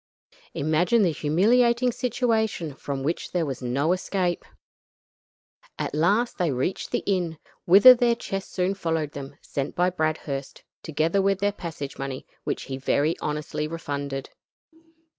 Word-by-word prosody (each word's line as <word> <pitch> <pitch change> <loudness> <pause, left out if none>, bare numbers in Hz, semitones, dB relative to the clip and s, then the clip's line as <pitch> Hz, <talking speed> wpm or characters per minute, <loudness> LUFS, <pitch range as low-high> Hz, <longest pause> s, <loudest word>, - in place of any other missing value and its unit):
Imagine 170 +9 +2
the 175 - +3
humiliating 235 - +3
situation, 225 - -1
from 135 0 -5
which 160 +5 -3
there 175 -3 +1
was 135 -3 -5
no 135 +6 0
escape. 185 -1 -1 1.3
At - - -3
last 200 +12 +1
they 175 -2 +2
reached 135 +9 -2
the - - -1
inn, 175 -5 0 0.3
whither 200 +8 +10
their 240 -1 +2
chests 195 -4 -5
soon 185 +1 0
followed 165 -6 -2
them, 140 0 -8
sent 140 +1 -4
by 180 +1 +2
Bradhurst, 155 -5 -3 0.2
together 160 +5 +1
with 195 0 +2
their 205 +1 +2
passage 160 -8 -7
money, 135 -1 -5 0.2
which - - -2
he 130 -1 -5
very 145 +4 +1
honestly 150 0 -3
refunded. 140 -4 -5
165 Hz, 140 wpm, -25 LUFS, 145-195 Hz, 1.3 s, whither